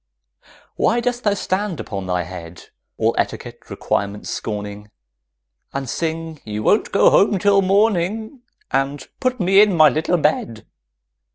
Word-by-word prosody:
Why 235 - +2
dost 245 0 -2
thou 205 -1 +3
stand 190 -2 -2
upon 95 -3 -5
thy 90 -1 0
head, 85 -1 -10 0.3
All - - +1
etiquette - - -4
requirements 100 +1 -3
scorning, 105 -1 -5 0.8
And 140 -1 -4
sing 160 +2 -4
"You 105 0 -5
won't 210 - +2
go 200 - +5
home 200 0 +4
till 200 +1 +3
morning" 210 +4 0 0.3
And 135 0 -1
"Put 255 -1 -1
me 195 +2 +5
in 205 -4 +3
my 155 -1 +7
little 160 +3 0
bed"? 115 -8 -1
165 Hz, 135 wpm, -20 LUFS, -, 0.8 s, my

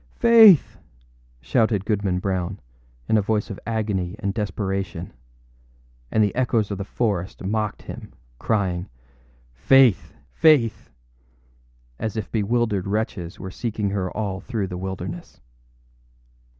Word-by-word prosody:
âFaith!â 225 - +8 0.8
shouted 105 - +1
Goodman 100 -4 0
Brown, 95 0 -2 0.5
in 110 - +3
a - - +2
voice 105 +1 -1
of 100 - -7
agony 105 -5 -2
and 100 -2 -2
desperation; 95 -4 -3 1.0
and 110 - +3
the 100 - 0
echoes 115 -5 0
of 100 - -4
the - - -2
forest 100 -4 -2
mocked 105 +1 -2
him, - - -9 0.3
crying, 95 - -1 0.7
âFaith! 130 - +4 0.2
Faith!â 140 -9 +3 1.1
as 110 0 -3
if 110 - -4
bewildered 110 -2 0
wretches 100 -4 -3
were 95 0 -7
seeking 105 -2 -3
her 95 -2 -2
all 100 -3 -2
through 110 -2 -3
the 90 -1 -6
wilderness. 95 0 -6
105 Hz, 120 wpm, -23 LUFS, 95-110 Hz, 1.1 s, âFaith!â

